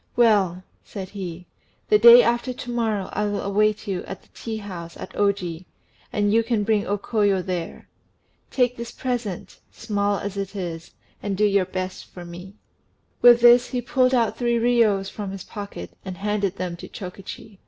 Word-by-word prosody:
"Well," 200 Hz, -6 st, +3 dB, 0.2 s
said 190 Hz, -3 st, -7 dB
he, 180 Hz, -3 st, -7 dB, 0.4 s
"the 210 Hz, -, +5 dB
day 235 Hz, +2 st, +10 dB
after 240 Hz, +2 st, 0 dB
to 245 Hz, 0 st, -7 dB
morrow 220 Hz, -5 st, -1 dB
I 210 Hz, -, 0 dB
will 205 Hz, -1 st, -2 dB
await 210 Hz, +2 st, +1 dB
you 190 Hz, -3 st, -2 dB
at 195 Hz, -, -8 dB
the -, -, -26 dB
tea 225 Hz, -1 st, -5 dB
house 180 Hz, -5 st, -8 dB
at -, -, -9 dB
Oji, 185 Hz, -4 st, -1 dB, 0.4 s
and 205 Hz, 0 st, +1 dB
you 230 Hz, -, +5 dB
can 225 Hz, -2 st, 0 dB
bring 210 Hz, -1 st, +1 dB
O 205 Hz, -, 0 dB
Koyo 205 Hz, -2 st, +1 dB
there. 180 Hz, -3 st, -5 dB, 0.6 s
Take 250 Hz, -1 st, +1 dB
this 235 Hz, 0 st, -6 dB
present, 240 Hz, -9 st, -4 dB
small 205 Hz, -2 st, -1 dB
as 200 Hz, 0 st, -5 dB
it 195 Hz, +1 st, -4 dB
is, 170 Hz, -4 st, -5 dB, 0.3 s
and 200 Hz, -2 st, -3 dB
do 210 Hz, -, +3 dB
your 200 Hz, -2 st, +3 dB
best 185 Hz, 0 st, -5 dB
for 175 Hz, -1 st, -11 dB
me." 180 Hz, +3 st, -10 dB, 0.7 s
With 240 Hz, -1 st, +8 dB
this 240 Hz, +1 st, +7 dB
he 250 Hz, -, -2 dB
pulled 255 Hz, +1 st, +2 dB
out 230 Hz, -3 st, +1 dB
three 240 Hz, -1 st, +1 dB
riyos 230 Hz, -5 st, +3 dB
from 205 Hz, -2 st, -5 dB
his 195 Hz, 0 st, -7 dB
pocket 205 Hz, -1 st, -8 dB
and 185 Hz, -2 st, -7 dB
handed 200 Hz, -1 st, -1 dB
them 180 Hz, -2 st, -4 dB
to -, -, -9 dB
Chokichi. 195 Hz, +1 st, -9 dB
205 Hz, 180 wpm, -23 LUFS, 190-230 Hz, 0.7 s, day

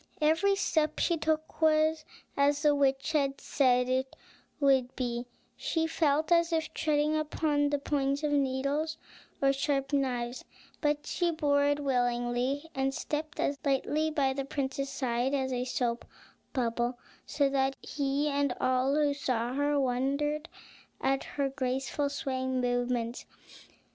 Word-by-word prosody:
Every 325 Hz, +6 st, +3 dB
step 310 Hz, -5 st, 0 dB
she 340 Hz, -, +2 dB
took 315 Hz, 0 st, -2 dB
was 310 Hz, 0 st, +3 dB, 0.3 s
as 285 Hz, +1 st, +2 dB
the 295 Hz, -1 st, +5 dB
witch 275 Hz, 0 st, +1 dB
had 275 Hz, -3 st, +1 dB
said 250 Hz, -3 st, +2 dB
it 260 Hz, +1 st, -1 dB, 0.4 s
would 265 Hz, -3 st, +3 dB
be, 245 Hz, -1 st, -3 dB, 0.3 s
she 330 Hz, -10 st, -1 dB
felt 310 Hz, -1 st, +1 dB
as 335 Hz, 0 st, +4 dB
if 320 Hz, -1 st, -1 dB
treading 300 Hz, 0 st, +1 dB
upon 300 Hz, -1 st, +1 dB
the 290 Hz, -, +1 dB
points 280 Hz, 0 st, -1 dB
of 300 Hz, -, +1 dB
needles 280 Hz, +3 st, 0 dB, 0.5 s
or 275 Hz, 0 st, +5 dB
sharp 275 Hz, 0 st, -1 dB
knives; 250 Hz, -3 st, -1 dB, 0.4 s
but 295 Hz, -1 st, 0 dB
she 350 Hz, -1 st, 0 dB
bore 290 Hz, -3 st, +2 dB
it 290 Hz, 0 st, +2 dB
willingly, 245 Hz, +2 st, 0 dB
and 270 Hz, 0 st, -1 dB
stepped 305 Hz, 0 st, -4 dB
as 280 Hz, 0 st, 0 dB
lightly 295 Hz, +2 st, +1 dB
by 280 Hz, -4 st, +1 dB
the 275 Hz, +1 st, -3 dB
prince's 275 Hz, 0 st, -3 dB
side 260 Hz, -1 st, -1 dB
as 265 Hz, -1 st, -1 dB
a 250 Hz, 0 st, -1 dB
soap 240 Hz, -2 st, -1 dB, 0.5 s
bubble, 240 Hz, -1 st, -1 dB, 0.3 s
so 285 Hz, -2 st, +2 dB
that 270 Hz, 0 st, +1 dB
he 285 Hz, 0 st, -1 dB
and 280 Hz, -3 st, 0 dB
all 255 Hz, +2 st, +2 dB
who 295 Hz, -1 st, +2 dB
saw 250 Hz, -4 st, -1 dB
her 285 Hz, +1 st, +1 dB
wondered 280 Hz, +4 st, 0 dB, 0.5 s
at 270 Hz, 0 st, +1 dB
her 280 Hz, -1 st, -1 dB
graceful 270 Hz, +1 st, -1 dB
swaying 260 Hz, -2 st, -2 dB
movements. 245 Hz, -1 st, -1 dB
280 Hz, 145 wpm, -30 LUFS, 260-300 Hz, 0.5 s, the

